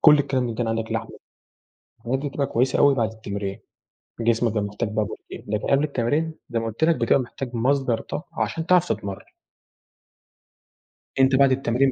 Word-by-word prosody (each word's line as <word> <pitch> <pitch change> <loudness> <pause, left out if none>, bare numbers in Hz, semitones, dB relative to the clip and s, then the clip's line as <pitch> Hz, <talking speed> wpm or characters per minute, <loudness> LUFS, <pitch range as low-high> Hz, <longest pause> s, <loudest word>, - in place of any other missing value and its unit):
كل 150 -1 +7
الكلام 135 -3 0
إن 115 - -3
كان 115 0 -1
عندك 115 0 -2
لحمة، - - -4 0.8
الحاجات 120 +3 -2
دي 145 +2 -3
بتبقى 140 0 -1
كويسة 130 +2 +1
أوي 140 -1 +6
بعد 115 -4 0
التمرين، 100 -3 -5 0.6
جسمك 115 0 +2
بيبقى 105 -1 0
محتاج 105 +2 -3
بقى 110 0 0
بروتين. - - -9
لكن 105 0 -2
قبل 140 +1 +3
التمرين 150 +3 0 0.2
زي 115 - 0
ما 115 - -3
قُلت 115 +6 -3
لك، 165 +1 +5
بتبقى 120 +1 +3
محتاج 125 0 -5
مصدر 125 -1 +1
طاقة 170 - -6
عشان 165 -1 -1
تعرف 180 0 +4
تتمرَّن. 100 -2 -7 1.9
أنت 135 0 +5
بعد 135 0 +5
التمرين 130 0 +2
125 Hz, 175 wpm, -24 LUFS, 115-140 Hz, 1.9 s, كل